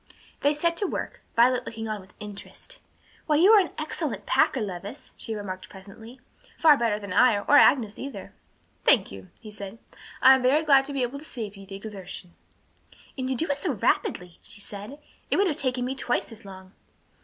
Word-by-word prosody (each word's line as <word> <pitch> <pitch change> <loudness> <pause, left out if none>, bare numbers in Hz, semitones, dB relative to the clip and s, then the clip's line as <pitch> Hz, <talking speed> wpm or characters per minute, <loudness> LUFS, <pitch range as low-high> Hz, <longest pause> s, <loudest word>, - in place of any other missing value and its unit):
They 285 - +3
set 335 +3 +1
to 400 - 0
work, - - -5
Violet 250 +2 +4
looking 225 -1 -6
on 215 -2 -4
with 190 0 -20
interest. 205 -1 -10 0.5
"Why, 305 - +3
you 360 +8 +6
are 435 - +8
an 370 - -3
excellent - - -4
packer, 265 - +2
Levis," 200 -2 -7
she 225 - -5
remarked 190 -3 -7
presently, 220 +6 -13 0.4
"far 310 -2 +6
better 230 -5 0
than 200 -3 -6
I 235 +1 +5
or 205 +8 +2
Agnes 225 -9 +4
either." 275 +1 -8 0.5
"Thank 235 -9 +4
you," 95 -1 -11
he 215 -2 -10
said, 200 0 -8 0.4
"I 265 - +8
am 265 - +2
very 275 +5 +3
glad 275 -3 +5
to 285 - -6
be 270 -2 0
able 255 +3 -3
to - - -12
save 220 -9 -6
you 195 0 -13
the 195 - -8
exertion." 195 -3 -8 0.8
"And 260 -1 -3
you 265 - 0
do 320 - +1
it 285 - -2
so 315 -2 -1
rapidly," 180 -4 -1
she - - -5
said. 205 +6 -8 0.3
"It - - +1
would 400 - +4
have 315 -6 -1
taken 250 -2 +1
me 260 - -2
twice 250 -2 -2
as 225 -1 -13
long." 190 -1 -12
230 Hz, 200 wpm, -26 LUFS, 200-275 Hz, 0.8 s, are